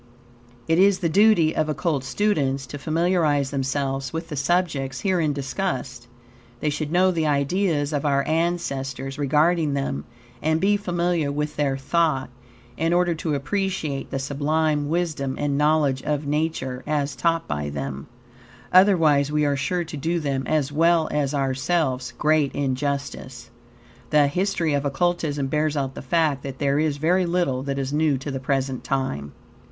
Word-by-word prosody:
It 165 +1 +3
is 195 0 +5
the 170 - -1
duty 195 -3 +4
of 155 0 0
Occult 155 -3 -1
students 135 -4 0
to 145 +3 -8
familiarize 155 -3 +1
themselves 135 0 -2
with 165 +1 -5
the 150 - -4
subjects 140 -3 0
herein 180 -6 +1
discussed. 130 -3 -3 0.5
They 150 - 0
should 150 +1 -3
know 185 +2 +4
the 160 -3 0
ideas 150 +1 +1
of 145 - -1
our 140 -2 +1
ancestors 140 -5 -2
regarding 150 +2 +2
them 135 - -2 0.4
and 160 +1 +1
be 200 +3 +3
familiar 175 -6 0
with 150 +1 -3
their 140 -2 0
thought, 135 -2 0 0.5
in 165 +2 +1
order 175 -1 +2
to 155 -2 -2
appreciate 160 -2 -2
the - - -3
sublime 145 +2 0
wisdom 155 -5 -1
and 145 -1 -1
knowledge 150 -2 +2
of 150 +1 -2
Nature 145 -4 -2
as 145 -2 -1
taught 165 -1 0
by 75 0 -3
them, 70 -1 -5 0.7
otherwise 165 -7 +5
we 150 0 +2
are 145 -1 +1
sure 175 +6 -1
to 160 -2 -7
do 165 +5 -1
them, 140 -3 -2
as 150 -3 0
well 165 +1 +3
as 145 -1 0
ourselves, 135 -1 0
great 150 -2 +2
injustice. 140 -3 -3 0.6
The 150 -1 +5
history 175 +1 0
of 140 -1 0
Occultism 150 -1 0
bears 150 +2 0
out 135 -1 -2
the - - -7
fact 150 0 +1
that 135 -1 -7
there 140 0 +1
is 155 -2 0
very 175 +4 +2
little 170 -7 0
that 140 0 -3
is 135 0 -2
new 150 -2 +2
to 140 +2 -5
the 135 - -3
present 130 -1 -1
time. 125 - -2
145 Hz, 160 wpm, -23 LUFS, 135-165 Hz, 0.7 s, is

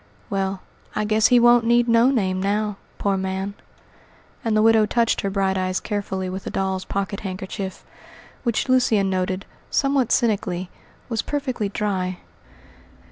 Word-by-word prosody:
Well, 195 -1 -1 0.3
I 215 - 0
guess 215 +1 +4
he 245 - +5
won't 240 0 +6
need 240 +1 +3
no 230 +2 +5
name 190 -8 0
now, 205 +1 0 0.2
poor 200 -1 0
man," 190 +1 -3 0.9
and 220 -2 +1
the 215 - +4
widow 225 -1 +5
touched 235 +1 +1
her 200 - -1
bright 190 -1 0
eyes 185 0 0
carefully 195 -3 -3
with 185 +1 -5
a - - -1
doll's 190 -1 -2
pocket 200 0 -3
handkerchief, 190 0 -6 0.6
which 235 0 0
Lucian 225 -7 +3
noted, 185 +1 -1 0.2
somewhat 275 -4 +1
cynically, 190 -5 0 0.4
was 230 -3 -1
perfectly 255 -8 -2
dry. 190 -3 -2
200 Hz, 145 wpm, -23 LUFS, 190-230 Hz, 0.9 s, won't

